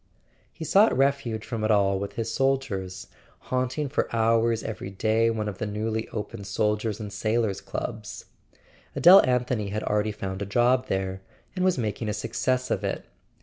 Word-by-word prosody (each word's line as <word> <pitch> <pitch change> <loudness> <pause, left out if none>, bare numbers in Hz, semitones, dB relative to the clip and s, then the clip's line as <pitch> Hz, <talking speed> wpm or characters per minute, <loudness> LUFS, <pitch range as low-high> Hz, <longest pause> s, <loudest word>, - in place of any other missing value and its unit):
He 160 - -7
sought 200 - +4
refuge 135 -5 0
from 115 -2 -4
it 110 - +1
all 100 -2 +3
with 100 0 -5
his 115 -1 -3
soldiers, 100 -9 -1 0.4
haunt¬ 130 0 -1
ing 150 -1 0
for 140 - -1
hours 115 0 +2
every 110 -3 -5
day 110 +4 +1
one 110 -2 -2
of 100 -3 -5
the 110 - -2
newly 110 +2 -2
opened 105 -1 -6
Sol¬ 105 +2 +1
diers' 110 -1 -3
and 105 -2 -6
Sailors' 110 -1 0
Clubs. - - -6 0.7
Adele 185 +3 +9
Anthony 125 -4 0
had 105 +2 -3
already 105 0 0
found 95 -2 -5
a - - -1
job 125 +4 +2
there, 95 -2 -2 0.3
and 185 - -1
was 185 -4 +3
making 110 -1 -2
a - - -1
success 125 +4 -1
of - - 0
it. - - -3
110 Hz, 180 wpm, -26 LUFS, 105-125 Hz, 0.7 s, Adele